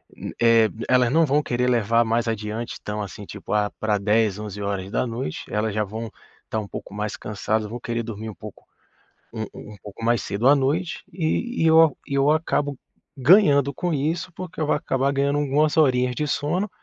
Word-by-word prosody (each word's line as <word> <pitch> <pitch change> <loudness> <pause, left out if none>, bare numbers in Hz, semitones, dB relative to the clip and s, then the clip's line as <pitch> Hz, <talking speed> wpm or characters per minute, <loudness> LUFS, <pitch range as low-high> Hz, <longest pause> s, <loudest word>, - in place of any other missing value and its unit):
hum, - - -7
eh, 115 -2 +5 0.2
elas 125 -1 +3
não 165 +3 +4
vão 145 +1 +2
querer 125 -3 -1
levar 115 -1 +3
mais 115 +1 0
adiante, 110 +1 -4
tão, 105 0 -3
assim, 105 +1 -7
tipo, - - -9
ah, 105 -1 +1
pra 105 -1 +1
22h, 105 0 +2
23h 100 0 -3
elas 105 0 -1
já 105 +1 +1
vão 110 +2 -6 0.4
tá 110 - 0
um 105 - -5
pouco 100 - -8
mais 105 0 -3
cansadas, 105 +1 -2
vão 120 +3 -6
querer 120 -1 -3
dormir 110 -1 -6
um 105 - -9
pouco 105 -2 -11 0.7
um 110 -1 -4
um 105 - -10
pouco 105 +2 -9
mais 120 0 +2
cedo 110 +6 +1
à 145 - +7
noite 150 +6 -1
e 185 +8 -1
e - - +5
eu 160 -2 +6
e 140 - -4
eu 140 +1 +3
acabo 145 -3 0 0.4
ganhando 140 -2 +5
com 175 +4 -2
isso, 160 +5 -2
porque 180 -1 -8
eu 155 - +1
vou - - +2
acabar 135 -1 0
ganhando 140 +1 +1
algumas 145 +2 +1
horinhas 125 -5 +3
de 150 - -1
sono 165 +8 -1
120 Hz, 195 wpm, -23 LUFS, 105-145 Hz, 0.7 s, à